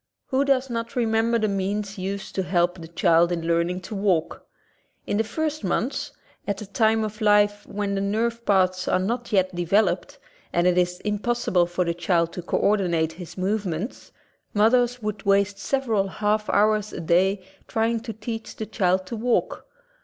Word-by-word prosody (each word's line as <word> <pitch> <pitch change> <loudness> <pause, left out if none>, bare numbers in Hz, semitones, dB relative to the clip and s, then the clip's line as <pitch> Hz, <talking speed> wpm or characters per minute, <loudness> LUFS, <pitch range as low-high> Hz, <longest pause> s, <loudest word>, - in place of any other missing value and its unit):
Who 265 +1 +2
does 270 -2 +2
not 230 -2 -4
remember 230 -1 +2
the 215 -1 +1
means 200 +1 -2
used 195 +1 -4
to 190 - 0
help 175 0 +1
the 165 - -8
child 170 0 +3
in 165 -2 -2
learning 170 +2 0
to 190 - -8
walk? 195 -5 0 0.6
In 205 - -1
the 220 - +2
first 310 +3 -3
months 225 +8 -1 0.2
— - - -34
at 200 -1 -1
a 215 - -6
time 220 +2 +2
of 215 +1 -5
life 205 -1 +3
when 205 -1 -2
the 195 - -1
nerve 230 +4 -1
paths 185 -3 +2
are - - +3
not 235 +6 -2
yet 190 -2 +2
developed 175 +5 +1 0.3
and 175 0 +1
it 180 -1 +4
is 180 0 0
impossi 225 +3 -1
ble 175 -2 +4
for 175 +1 -1
the 170 - 0
child 170 -1 0
to 180 - -5
co 175 - -1
ordinate 175 -6 +1
his 170 +2 -10
movements 190 - -3 0.2
— - - -45
mothers 240 +3 +3
would 210 -1 -3
waste 200 0 +2
several 230 -8 0
half 210 +2 -1
hours 215 0 +2
a - - -6
day 185 +4 +2 0.2
trying 225 +1 0
to 225 - -6
teach 225 +1 -6
the 220 - -4
child 185 -4 +1
to 210 - -5
walk. 235 +2 -1
200 Hz, 185 wpm, -24 LUFS, 180-220 Hz, 0.6 s, it